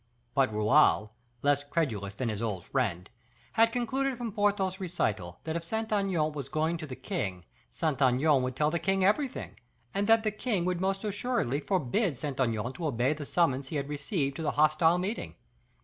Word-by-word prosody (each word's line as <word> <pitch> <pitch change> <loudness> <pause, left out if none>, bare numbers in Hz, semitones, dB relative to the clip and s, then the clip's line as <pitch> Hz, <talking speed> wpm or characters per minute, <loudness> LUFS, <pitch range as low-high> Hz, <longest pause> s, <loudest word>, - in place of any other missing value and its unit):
But 135 -4 +3
Raoul, 110 0 +4 0.3
less 145 0 +3
credulous 115 - -2
than 120 +3 -2
his 105 -1 -3
old 100 -6 -3
friend, 100 -9 -1 0.4
had 230 0 +4
concluded 260 +2 -1
from 235 -2 -4
Porthos's 200 -2 +1
recital 105 - -2
that 160 0 -3
if 170 - -2
Saint 220 +5 -2
Aignan 185 -7 +1
was 140 -3 -6
going 155 +3 0
to 160 -1 -7
the 130 - -6
king, 95 - -4 0.2
Saint 155 -4 -2
Aignan 135 +2 +4
would 125 0 -2
tell 150 +2 +2
the 170 - 0
king 195 0 +1
everything, 260 +6 0 0.3
and 200 +1 0
that 225 0 +5
the 215 - +1
king 210 -4 -1
would 180 -1 -1
most 195 0 0
assuredly 205 - -1
forbid 180 - 0
Saint 140 -1 -5
Aignan 115 -1 0
to 165 +3 -3
obey 130 +1 +1
the 150 -1 -7
summons 140 -5 +1
he 155 - -6
had 140 -1 -2
received 145 -1 -2
to - - -4
the 160 - 0
hostile 155 +3 +4
meeting. 195 +6 -3
155 Hz, 190 wpm, -29 LUFS, 130-195 Hz, 0.4 s, that